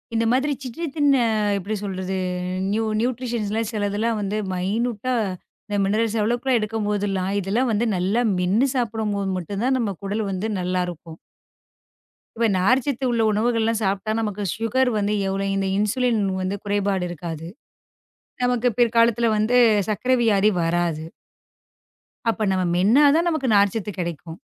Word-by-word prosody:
இந்த 225 Hz, 0 st, +2 dB
மாதிரி 265 Hz, +4 st, +1 dB
சிற்றிதின் 290 Hz, +3 st, -1 dB, 0.5 s
எப்படி 200 Hz, +3 st, -3 dB
சொல்றது? 190 Hz, -2 st, -4 dB, 0.6 s
நியூ 220 Hz, +2 st, 0 dB, 0.2 s
நியூட்ரிஷன்லாம் 230 Hz, -3 st, -2 dB
சிலதெல்லாம் 215 Hz, +1 st, -1 dB
வந்து 205 Hz, +1 st, -2 dB, 0.2 s
மைனுட்டா 220 Hz, +6 st, -1 dB, 0.7 s
மினெரல்ஸ் 220 Hz, +2 st, 0 dB
அளவுக்குலாம் 240 Hz, +4 st, +1 dB
எடுக்கும்போதெல்லாம், 205 Hz, -3 st, -1 dB
இதெல்லாம் 215 Hz, +7 st, 0 dB
வந்து 220 Hz, +2 st, +1 dB
நல்லா 190 Hz, +6 st, +1 dB, 0.2 s
மென்னு 195 Hz, +9 st, +2 dB
சாப்பிடும்போது 215 Hz, -5 st, -1 dB
மட்டும் 195 Hz, +3 st, -4 dB
தான் 260 Hz, 0 st, +2 dB
நம்ம 210 Hz, -5 st, -1 dB
உடல் 210 Hz, +1 st, -2 dB
வந்து 195 Hz, +4 st, -2 dB
நல்லா 180 Hz, 0 st, -1 dB
இருக்கும். 165 Hz, -2 st, -9 dB, 1.2 s
இப்ப 230 Hz, 0 st, +2 dB
நார்சத்து 255 Hz, +7 st, +1 dB
உள்ள 235 Hz, -1 st, +1 dB
உணவுகள் 225 Hz, +2 st, +1 dB
எல்லாம் 225 Hz, 0 st, +1 dB
சாப்பிட்டா 195 Hz, +2 st, -1 dB
நமக்கு 210 Hz, -2 st, -3 dB
சுகர் 250 Hz, +3 st, +1 dB
வந்து 205 Hz, 0 st, 0 dB
எவ்வளவு 195 Hz, 0 st, -1 dB
இந்த 195 Hz, 0 st, 0 dB
இன்சுலின் 230 Hz, +2 st, +1 dB, 0.2 s
வந்து 185 Hz, +2 st, -2 dB
குறைபாடு 200 Hz, -2 st, 0 dB
இருக்காது. 165 Hz, -1 st, -6 dB, 1.0 s
நமக்கு 245 Hz, 0 st, +2 dB
பிற்காலத்துல 235 Hz, -1 st, +3 dB
வந்து 220 Hz, +4 st, +2 dB, 0.3 s
சர்க்கரை 250 Hz, +5 st, +1 dB
வியாதி 210 Hz, -2 st, +4 dB
வராது. 165 Hz, -2 st, 0 dB, 1.3 s
அப்ப 225 Hz, -, -2 dB
நம்ம 185 Hz, -1 st, +1 dB
மென்னா 215 Hz, +11 st, +4 dB
தான் 335 Hz, +2 st, +2 dB
நமக்கு 310 Hz, -5 st, -1 dB
நார்சத்து 205 Hz, +1 st, +2 dB
கெடைக்கும். 170 Hz, -1 st, -5 dB
210 Hz, 130 wpm, -23 LUFS, 195-235 Hz, 1.3 s, வியாதி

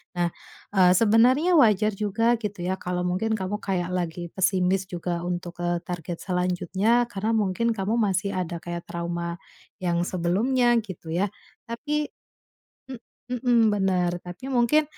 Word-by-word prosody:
Nah, 175 Hz, 0 st, +1 dB, 0.5 s
eee, 180 Hz, -2 st, +6 dB
sebenarnya 250 Hz, +10 st, +4 dB
wajar 215 Hz, -, +5 dB
juga 220 Hz, +4 st, +1 dB
gitu 205 Hz, -4 st, -5 dB
ya, 185 Hz, +1 st, 0 dB
kalau 180 Hz, 0 st, -2 dB
mungkin 190 Hz, +5 st, -1 dB
kamu 205 Hz, +1 st, -3 dB
kayak 180 Hz, -2 st, -1 dB
lagi 175 Hz, -1 st, -3 dB
pesimis 185 Hz, 0 st, +2 dB
juga, 175 Hz, -1 st, -3 dB
eee, -, -, -5 dB
untuk 175 Hz, 0 st, -10 dB
ke 175 Hz, 0 st, 0 dB
target 175 Hz, -1 st, -4 dB
selanjutnya, 185 Hz, +6 st, +1 dB
karena 210 Hz, +3 st, -1 dB
mungkin 220 Hz, +2 st, +1 dB
kamu 205 Hz, +3 st, -1 dB
masih 200 Hz, -2 st, +1 dB
ada 175 Hz, -2 st, -2 dB
kayak 175 Hz, 0 st, -6 dB
trauma 170 Hz, 0 st, -3 dB, 0.5 s
yang 170 Hz, -1 st, +1 dB
sebelumnya 230 Hz, +9 st, +2 dB
gitu 185 Hz, -5 st, -10 dB
ya. 180 Hz, +5 st, +1 dB, 0.4 s
tapi, 295 Hz, +5 st, -2 dB, 0.8 s
m 260 Hz, -3 st, -7 dB, 0.4 s
mhm 245 Hz, -2 st, +3 dB, 0.2 s
benar. 185 Hz, -3 st, +1 dB
Tapi, 180 Hz, +8 st, -9 dB
mungkin, 260 Hz, +5 st, +4 dB
190 Hz, 145 wpm, -25 LUFS, 175-225 Hz, 0.8 s, eee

